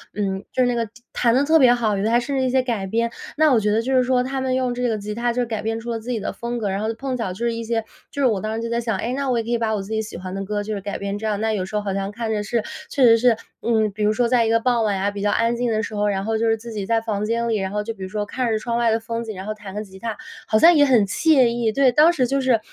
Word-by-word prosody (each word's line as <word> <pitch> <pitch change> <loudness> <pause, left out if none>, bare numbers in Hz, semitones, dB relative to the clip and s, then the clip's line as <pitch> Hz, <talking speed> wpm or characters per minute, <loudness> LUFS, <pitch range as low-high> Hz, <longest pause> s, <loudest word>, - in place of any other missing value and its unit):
嗯， 195 -2 -2
就 255 - +2
是 245 - +3
那 245 - +1
个 230 -2 -2 0.2
弹 235 -2 +2
得 270 - +3
特 320 +2 +4
别 255 -3 +6
好， 220 -4 0
有 195 - -2
的 220 - +1
还 235 - +4
甚 275 +3 -3
至 265 - +1
一 260 - +1
些 260 0 +2
改 225 -6 -2
编。 230 +3 0 0.3
那 310 -3 +5
我 230 - +5
觉 210 0 0
得 220 +2 +1
就 265 +3 -1
是 255 - +5
说， 250 0 +2
他 265 +1 -3
们 260 -1 0
用 255 -1 0
这 250 - -5
个 220 - -1
吉 210 +1 -5
他 235 +2 0
就 245 +1 0
是 - - -2
改 220 -2 -4
编 225 +1 -2
出 235 +1 -5
了 230 - -2
自 225 +3 -9
己 235 -3 -1
的 - - -4
风 240 +1 -4
格， 210 -4 -2
然 195 +1 -2
后 215 - -1
就 225 - -3
碰 265 +1 -3
巧 225 -6 -3
就 235 +6 -4
是 235 - +1
一 230 0 -4
些 225 0 -1 0.3
就 285 - -8
是 275 - +3
我 215 -6 +2
当 215 +1 -3
时 230 - -3
就 - - -2
在 235 0 0
想， 225 -4 -1
哎， 240 +6 -3
那 275 0 -2
我 245 - +1
也 230 - 0
可 235 - -5
以 235 - +2
把 220 -1 0
我 205 - -2
自 195 - -11
己 220 - 0
喜 215 -5 -7
欢 185 +1 -7
的 195 0 -3
歌 205 +1 -2
就 215 +1 -4
是 200 - -4
改 200 +1 -4
编 200 +1 -4
这 220 - -3
样。 210 -2 -1
那 220 0 0
有 190 -3 -1
时 215 - -7
候 210 - +1
好 200 -1 -2
像 195 0 -2
看 225 +1 -4
着 210 -1 0
是 225 +1 -1 0.3
确 275 - +1
实 230 -1 +7
是， 240 -2 +4 0.2
嗯， 220 -3 +1
比 210 +1 -4
如 210 - +3
说 240 +2 +1
在 235 -1 +3
一 - - 0
个 230 0 +3
傍 240 -1 +1
晚 205 -3 0
呀， 200 +2 0
比 200 0 -6
较 205 - +1
安 230 +2 +1
静 240 0 -1
的 215 0 0
时 215 - -5
候， 205 0 +1
然 195 -1 -1
后 225 0 0
就 230 - +1
是 225 0 +2
自 235 +1 -9
己 200 -2 -3
在 230 0 +2
房 210 -2 -2
间 235 +2 -1
里， 220 - +1
然 190 -1 -3
后 210 0 -2
就 225 +2 -4
比 195 - -16
如 185 - -5
说 210 +1 -2
看 250 +3 -2
着 220 - +1
窗 235 +1 -2
外 235 - +3
的 225 - +1
风 230 +1 -4
景， 220 -3 -6
然 190 +1 -7
后 215 - -3
弹 205 -2 -10
个 210 - -3
吉 190 -2 -14
他， 225 0 -4 0.3
好 215 - +3
像 340 +8 +7
也 295 - +5
很 245 -6 +4
惬 270 - +3
意。 235 -1 0
对， 265 +2 +3
当 305 +6 +6
时 260 -6 +1
就 275 +2 0
是 255 -3 +3
225 Hz, 395 characters per minute, -22 LUFS, 210-245 Hz, 0.3 s, 实